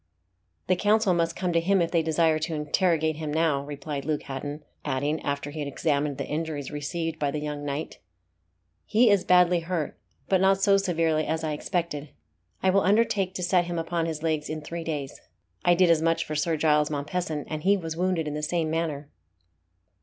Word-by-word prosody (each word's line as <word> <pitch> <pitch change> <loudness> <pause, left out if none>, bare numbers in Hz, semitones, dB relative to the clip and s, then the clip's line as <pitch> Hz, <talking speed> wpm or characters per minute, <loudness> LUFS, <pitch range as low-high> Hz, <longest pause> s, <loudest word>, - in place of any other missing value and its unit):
"The 185 - +2
Council 205 +1 +3
must 170 -1 0
come 180 -2 -1
to 165 - +4
him 190 +3 +2
if 170 -1 0
they 170 - +3
desire 160 0 +2
to 160 +1 -2
interrogate 160 0 +1
him 155 -2 -4
now," 155 -3 +1
replied 145 0 -5
Luke 150 0 -2
Hatton; 145 +2 -6 0.2
adding, 145 +2 -1
after 140 0 -3
he 155 - -7
had 145 - -2
examined 145 0 -1
the - - -3
injuries 150 -2 -3
received 160 +2 -3
by 145 - +1
the 150 +2 -2
young 150 -1 -4
knight, 145 +2 -4 0.9
"He 225 +1 +5
is 200 -2 +3
badly 180 -1 +5
hurt, 165 -3 -3 0.3
but 190 -1 +3
not 190 0 +4
so 195 0 +4
severely 165 -5 +1
as 160 0 -1
I 155 -1 -1
expected. 150 -2 -3 0.5
I 190 - +4
will 195 +1 +4
undertake 200 -2 +2
to 180 - -3
set 175 0 +3
him 175 0 -4
upon 165 0 -1
his 160 -1 -4
legs 155 -2 -1
in 155 0 -4
three 165 +2 -5
days. 150 -4 -5 0.4
I 175 0 +5
did 175 -1 +5
as 160 -2 +3
much 165 0 +1
for 155 - -5
Sir 160 +2 0
Giles 150 -1 +3
Mompesson, 150 +1 -3
and 155 -1 -4
he 200 +4 +4
was 165 -3 -5
wounded 175 -2 0
in 150 - -3
the 150 - -3
same 160 0 -1
manner." 155 -3 -2
160 Hz, 200 wpm, -26 LUFS, 150-175 Hz, 0.9 s, He